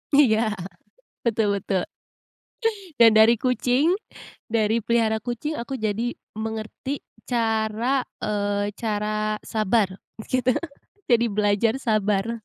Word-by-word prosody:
Iya, 245 -7 +5 0.9
betul 225 -2 +2
betul. 190 -2 -1 1.2
Dan 225 -1 +8
dari 220 +2 +6
kucing, 255 - +2 0.6
dari 220 0 +2
pelihara 230 -2 +2
kucing, 245 +7 -4
aku 250 +1 -5
jadi 220 +3 -1 0.2
mengerti 220 +5 -4 0.2
cara, 230 +2 0 0.2
eee, 205 -1 -1
cara 215 -1 -1
sabar 215 -1 +1 0.4
gitu. 255 0 +2 0.6
Jadi 235 -1 +4
belajar 210 +4 +2
sabar. 215 0 0
220 Hz, 95 wpm, -24 LUFS, 215-240 Hz, 1.2 s, Dan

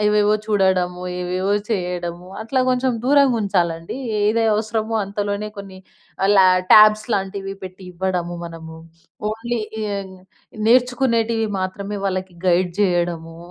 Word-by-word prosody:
ఏవేవో 210 0 +3
చూడడము, 185 -3 +1 0.2
ఏవేవో 185 +3 -1 0.2
చెయ్యడము, 180 -3 -3 0.2
అట్లా 260 +3 0
కొంచెం 255 0 +1
దూరంగుంచాలండీ. 205 - +2 0.3
ఏది 220 +2 +2
అవసరమో 220 +1 -2
అంతలోనే 205 +1 -3
కొన్ని 195 -1 -9 0.6
లా 190 - +7 0.3
ట్యాబ్స్ 215 +1 +7
లాంటివి 195 0 -2
పెట్టి 185 +1 -9
ఇవ్వడము 175 -1 -2
మనము. 160 -1 -9 0.5
ఓన్లీ 230 +2 -3 0.4
ఎయ్ 190 -1 -6 0.5
నేర్చుకునేటివి 235 -2 +2
మాత్రమే 200 +2 -4
వాళ్ళకి 185 -1 -2
గైడ్ 180 0 +3
జెయ్యడము, 175 -4 0
195 Hz, 105 wpm, -21 LUFS, 180-220 Hz, 0.6 s, లా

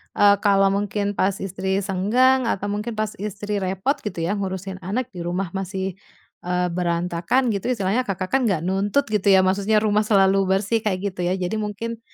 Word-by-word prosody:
eee, 205 0 +6
kalau 195 -1 +4
mungkin 205 0 -1
pas 190 +1 +1
istri 190 +1 -1
senggang 235 +7 +2
atau 205 -2 -1
mungkin 215 +2 -3
pas 215 -1 -1
istri 205 0 -3
repot 190 +10 0
gitu 190 -5 -4
ya, 185 +5 0
ngurusin 190 0 -4
anak 245 +7 -3
di - - -6
rumah 175 +1 -2
masih, 190 -1 -3 0.5
eee, 180 0 0
berantakan 175 +7 0
gitu, 200 +6 -2
istilahnya 220 +2 0
Kakak 185 -1 -3
kan 270 - +4
nggak 175 -5 0
nuntut 200 +8 +1
gitu 210 -1 0
ya, 190 -1 +6
maksudnya 200 +3 +2
rumah 210 0 +2
selalu 195 -2 +4
bersih, 195 +4 +1
kayak 190 -4 0
gitu 180 - -18
ya. 185 - +1
Jadi 185 +4 -2
mungkin, 220 +2 -4
195 Hz, 185 wpm, -22 LUFS, 185-210 Hz, 0.5 s, eee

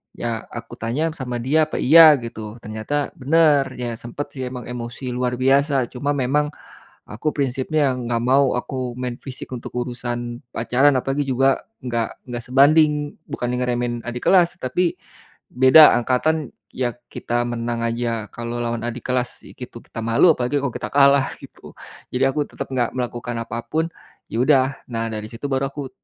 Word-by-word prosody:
ya 115 -2 -4
aku 120 -1 -8
tanya 130 +9 -1
sama 125 -3 -4
dia 155 +6 +3
apa - - -3
iya 160 +3 +9
gitu 110 -2 -7
ternyata 110 +7 -2
bener 145 -1 +3
ya 120 -1 -3
sempat 120 +5 -6
sih 130 -1 -4
emang 125 -1 -7
emosi 125 +2 -6
luar 125 0 -1
biasa 135 -1 +2
cuma 140 +3 -2
memang, 145 +3 +1 0.6
aku 135 +9 -2
prinsipnya 135 +1 0
gak 120 -2 -2
mau 135 +2 +3
aku 125 -1 -5
main 125 -1 -4
fisik 130 -1 -8
untuk 120 - -8
urusan 120 0 -4
pacaran 130 +5 +3
apalagi 135 +2 -1
juga 135 +1 +2 0.2
gak 120 -3 -3
gak 120 -1 -5
sebanding 145 +2 +4
bukannya 125 0 -3
ngeremehin 120 -1 -1
adik 120 0 -5
kelas 180 -3 +4
tapi, 170 +7 0 0.6
beda 130 +5 +8
angkatan 130 +4 0 0.2
ya 125 -1 -1 0.2
kita 120 0 -2
menang 120 -1 -3
aja 115 -1 -2
kalau 120 0 -5
lawan 115 -1 -2
adik 120 - -6
kelas 125 -1 -2
gitu - - -10
kita - - -10
malu 115 +9 +5
apalagi 125 +3 -1
kalau 135 -3 -2
kita - - -5
kalah 140 -1 +5
gitu - - -13 0.4
jadi 130 +1 +2
aku 150 0 0
tetap - - -6
gak 120 -2 0
melakukan 120 -1 -4
apa 115 0 -5
pun, 160 +6 0 0.4
ya 115 - -3
udah 135 -2 +4 0.2
nah 115 -1 -2
dari 110 -1 -5
situ 115 +4 -8
baru 135 +1 +1
aku, 140 -2 -6
125 Hz, 165 wpm, -21 LUFS, 120-140 Hz, 0.6 s, iya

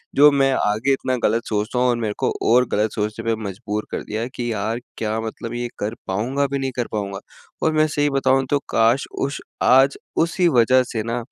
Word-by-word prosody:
जो 145 +1 +8
मैं 135 -1 +3
आगे 110 +4 +1
इतना 130 -1 -1
गलत 115 +1 +2
सोचता 110 +3 -1
हूँ 125 - +3
और 120 - +1
मेरे 105 -2 -1
को - - +1 0.2
और 125 +2 +5
गलत 105 +1 +1
सोचने 105 +2 -3
पे 115 0 +1
मजबूर 105 +1 -4
कर - - -3
दिया 110 +2 -3
कि 120 -1 -2
यार! 110 +3 -2 0.2
क्या 110 0 -2
मतलब 115 +1 -6
ये 120 0 -2
कर 105 +3 -3
पाऊँगा 120 +9 0
भी, 140 0 -2
नहीं 135 -1 -2
कर 120 - -1
पाऊँगा? 100 -2 -3 0.4
और 160 - +2
मैं 155 0 +3
सही 145 -1 +1
बताऊँ 135 -1 +2
तो 145 - +3
काश! 115 +5 +3
उस 140 +1 -2 0.2
आज 135 +2 +5 0.3
उसी 175 +1 +1
वजह 130 +3 +5
से 110 - -1
ना 115 +1 -3
120 Hz, 210 wpm, -21 LUFS, 110-135 Hz, 0.4 s, जो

